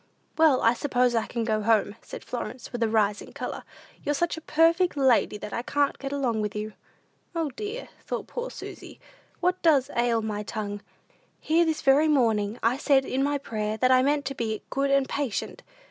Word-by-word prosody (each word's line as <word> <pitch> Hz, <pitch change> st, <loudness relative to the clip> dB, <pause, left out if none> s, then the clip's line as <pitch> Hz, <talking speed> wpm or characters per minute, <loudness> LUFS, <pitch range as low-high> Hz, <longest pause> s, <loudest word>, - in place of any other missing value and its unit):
"Well, 315 Hz, -5 st, +4 dB
I 230 Hz, -, +5 dB
suppose 250 Hz, -1 st, +1 dB
I 225 Hz, -2 st, 0 dB
can 235 Hz, -1 st, -2 dB
go 215 Hz, -1 st, 0 dB
home," 215 Hz, -1 st, +2 dB
said -, -, -9 dB
Florence, 250 Hz, 0 st, -6 dB
with 240 Hz, -, -5 dB
a 225 Hz, -, +2 dB
rising 210 Hz, -2 st, 0 dB
color; -, -, -5 dB, 0.4 s
"you're 290 Hz, -, 0 dB
such 345 Hz, +4 st, 0 dB
a 320 Hz, -, -8 dB
perfect 330 Hz, +2 st, +3 dB
lady 260 Hz, -6 st, +3 dB
that 210 Hz, -, -8 dB
I -, -, -1 dB
can't 285 Hz, +3 st, 0 dB
get 275 Hz, 0 st, -5 dB
along 250 Hz, -6 st, 0 dB
with 210 Hz, -1 st, -3 dB
you." 210 Hz, 0 st, -4 dB, 0.6 s
"O, 325 Hz, -4 st, -1 dB
dear," 430 Hz, -, -6 dB, 0.2 s
thought -, -, -4 dB
poor -, -, -5 dB
Susy, -, -, -10 dB, 0.4 s
"what 360 Hz, +1 st, +1 dB
does 290 Hz, -6 st, +3 dB
ail 235 Hz, -2 st, +2 dB
my 210 Hz, -1 st, -3 dB
tongue? 205 Hz, -1 st, -5 dB, 0.6 s
Here 330 Hz, +2 st, +2 dB
this 320 Hz, -1 st, -1 dB
very 280 Hz, +3 st, +5 dB
morning 225 Hz, -7 st, +2 dB
I 235 Hz, +3 st, +2 dB
said 275 Hz, -2 st, +3 dB
in 265 Hz, +1 st, -1 dB
my 285 Hz, +1 st, +1 dB
prayer, 215 Hz, -5 st, -3 dB
that 255 Hz, +2 st, +3 dB
I 255 Hz, 0 st, +6 dB
meant 285 Hz, +1 st, +1 dB
to 275 Hz, -, -2 dB
be 220 Hz, -4 st, -3 dB
good 275 Hz, +1 st, 0 dB
and 275 Hz, -1 st, +3 dB
patient." 280 Hz, -7 st, -3 dB
255 Hz, 195 wpm, -26 LUFS, 220-290 Hz, 0.6 s, I